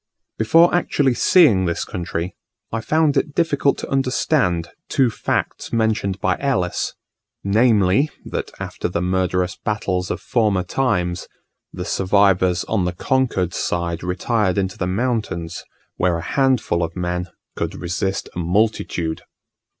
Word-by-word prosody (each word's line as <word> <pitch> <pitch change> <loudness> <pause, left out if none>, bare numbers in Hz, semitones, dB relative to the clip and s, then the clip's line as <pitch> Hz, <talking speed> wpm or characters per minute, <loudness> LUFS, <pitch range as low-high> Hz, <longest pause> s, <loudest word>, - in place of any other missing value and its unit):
Before 165 +10 +5
actually 145 -6 +2
seeing 120 - +5
this 85 -1 -1
country, 85 0 -4 0.4
I 115 - -2
found 155 +2 +2
it 150 - -1
difficult 145 -4 +2
to - - -6
understand 125 - +1 0.2
two 130 -4 +2
facts - - -2
mentioned 110 -4 0
by 95 -1 +1
Ellis; 125 -11 -1 0.5
namely, 105 +3 +3 0.2
that - - -4
after - - -4
the 85 - -2
murderous 90 0 0
battles 95 -4 -2
of - - -2
former 105 -6 +1
times, 90 -6 -1 0.4
the - - -6
survivors 95 -2 +2
on 100 -5 0
the 90 - -1
conquered 95 -4 0
side 85 -1 -2
retired 95 +2 0
into 95 -1 -1
the 90 - -2
mountains, 95 -5 -2 0.3
where 90 -2 +1
a 85 - -6
handful 130 -8 +1
of 85 0 -3
men 90 0 -2 0.3
could - - -3
resist 95 +2 -2
a - - -3
multitude. 90 -3 0
95 Hz, 135 wpm, -21 LUFS, 90-120 Hz, 0.5 s, Before